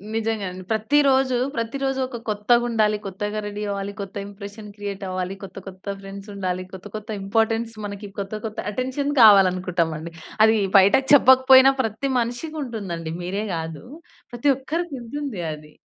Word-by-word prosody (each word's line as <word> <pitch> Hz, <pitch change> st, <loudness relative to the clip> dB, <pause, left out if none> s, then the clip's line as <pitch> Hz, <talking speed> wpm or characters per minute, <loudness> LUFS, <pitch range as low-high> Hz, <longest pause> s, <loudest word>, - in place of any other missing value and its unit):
నిజంగా 225 Hz, -2 st, -1 dB
అండి. 185 Hz, +1 st, -9 dB
ప్రతి 220 Hz, +7 st, +2 dB
రోజు, 265 Hz, -2 st, +3 dB, 0.2 s
ప్రతిరోజు 265 Hz, +3 st, -2 dB
ఒక 250 Hz, -2 st, -7 dB
కొత్తగుండాలి, 215 Hz, 0 st, +2 dB
కొత్తగా 205 Hz, +2 st, -3 dB
రెడీ 205 Hz, 0 st, -5 dB
అవ్వాలి, 200 Hz, 0 st, -3 dB
కొత్త 195 Hz, -1 st, -8 dB
ఇంప్రెషన్ 205 Hz, +1 st, -10 dB
క్రియేట్ 205 Hz, -1 st, -6 dB
అవ్వాలి, 185 Hz, +1 st, -3 dB
కొత్త, 190 Hz, -1 st, -10 dB
కొత్త 185 Hz, +1 st, -11 dB
ఫ్రెండ్స్ 195 Hz, +1 st, -10 dB
ఉండాలి, 185 Hz, -2 st, -2 dB
కొత్త, 190 Hz, +1 st, -10 dB
కొత్త 215 Hz, 0 st, -7 dB
ఇంపార్టెన్స్ 225 Hz, +3 st, 0 dB
మనకి 200 Hz, 0 st, -7 dB
కొత్త, 195 Hz, +1 st, -5 dB
కొత్త 220 Hz, -1 st, -5 dB
అటెన్షన్ 260 Hz, +5 st, -2 dB
కావాలనుకుంటామండి. 180 Hz, -6 st, +4 dB, 0.3 s
అది 220 Hz, 0 st, +4 dB, 0.2 s
బయటకి 235 Hz, +8 st, +5 dB
చెప్పకపోయినా 260 Hz, -1 st, +7 dB
ప్రతి 225 Hz, +5 st, -2 dB
మనిషికుంటుందండి. 235 Hz, -, -4 dB
మీరే 195 Hz, +4 st, -2 dB
గాదు 160 Hz, +2 st, -5 dB, 0.5 s
ప్రతి 240 Hz, +4 st, +1 dB
ఒక్కరికుంటుంది 280 Hz, -, -4 dB
అది. 150 Hz, 0 st, -12 dB
210 Hz, 135 wpm, -23 LUFS, 195-245 Hz, 0.5 s, చెప్పకపోయినా